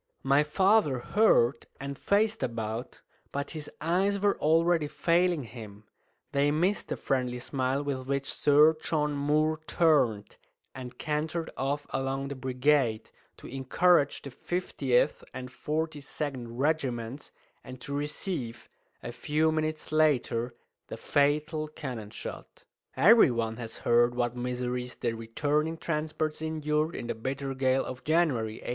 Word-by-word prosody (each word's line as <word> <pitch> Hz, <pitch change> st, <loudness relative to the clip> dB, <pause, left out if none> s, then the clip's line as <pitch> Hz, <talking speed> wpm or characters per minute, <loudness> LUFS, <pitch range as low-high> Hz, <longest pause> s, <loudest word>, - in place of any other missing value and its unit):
My 140 Hz, +2 st, +4 dB
father 185 Hz, -1 st, +3 dB
heard, 125 Hz, -, +3 dB
and 140 Hz, 0 st, -5 dB
faced 210 Hz, +7 st, +1 dB
about, 115 Hz, 0 st, -4 dB, 0.3 s
but 140 Hz, 0 st, -3 dB
his 155 Hz, -3 st, -7 dB
eyes 190 Hz, +6 st, +1 dB
were 200 Hz, 0 st, +2 dB
already 165 Hz, 0 st, +3 dB
failing 170 Hz, 0 st, +1 dB
him; 110 Hz, -3 st, -10 dB, 0.5 s
they 140 Hz, +1 st, +2 dB
missed 175 Hz, +7 st, +1 dB
the -, -, -3 dB
friendly 125 Hz, -2 st, -1 dB
smile 130 Hz, +2 st, -1 dB
with 135 Hz, -2 st, -3 dB
which 140 Hz, 0 st, -1 dB
Sir 150 Hz, +2 st, +5 dB
John 150 Hz, -2 st, 0 dB
Moore 150 Hz, +2 st, +1 dB
turned, 130 Hz, -11 st, +2 dB, 0.4 s
and 125 Hz, -1 st, -8 dB
cantered 155 Hz, +2 st, -2 dB
off 140 Hz, +2 st, -2 dB
along 135 Hz, +1 st, -2 dB
the 140 Hz, -, -4 dB
brigade, 130 Hz, -2 st, +1 dB, 0.3 s
to -, -, -14 dB
encourage 140 Hz, +4 st, +2 dB
the 140 Hz, -, -7 dB
50th 135 Hz, -5 st, 0 dB
and 125 Hz, 0 st, -6 dB
42nd 150 Hz, -4 st, -3 dB
regiments, 130 Hz, -1 st, -2 dB, 0.3 s
and 130 Hz, -1 st, -10 dB
to 140 Hz, -, -6 dB
receive, 145 Hz, -, -4 dB, 0.4 s
a 120 Hz, -, -5 dB
few 155 Hz, +5 st, +1 dB
minutes 155 Hz, -1 st, -2 dB
later, 125 Hz, -6 st, +1 dB, 0.3 s
the -, -, -7 dB
fatal 150 Hz, +2 st, +1 dB
cannon 130 Hz, -8 st, -6 dB
shot. -, -, -9 dB, 0.3 s
Every 225 Hz, -6 st, +7 dB
one 115 Hz, -2 st, -2 dB
has 115 Hz, -2 st, -7 dB
heard 120 Hz, +1 st, +4 dB
what 120 Hz, 0 st, 0 dB
miseries 125 Hz, 0 st, -3 dB
the 120 Hz, -2 st, -2 dB
returning 145 Hz, +8 st, -1 dB
transports 155 Hz, -1 st, -2 dB
endured 155 Hz, 0 st, -1 dB
in -, -, -5 dB
the -, -, -2 dB
bitter 135 Hz, +4 st, -4 dB
gale 130 Hz, 0 st, +1 dB
of 130 Hz, -, -7 dB
January, 150 Hz, -9 st, +1 dB
1809. -, -, -4 dB
140 Hz, 135 wpm, -29 LUFS, 125-155 Hz, 0.5 s, Every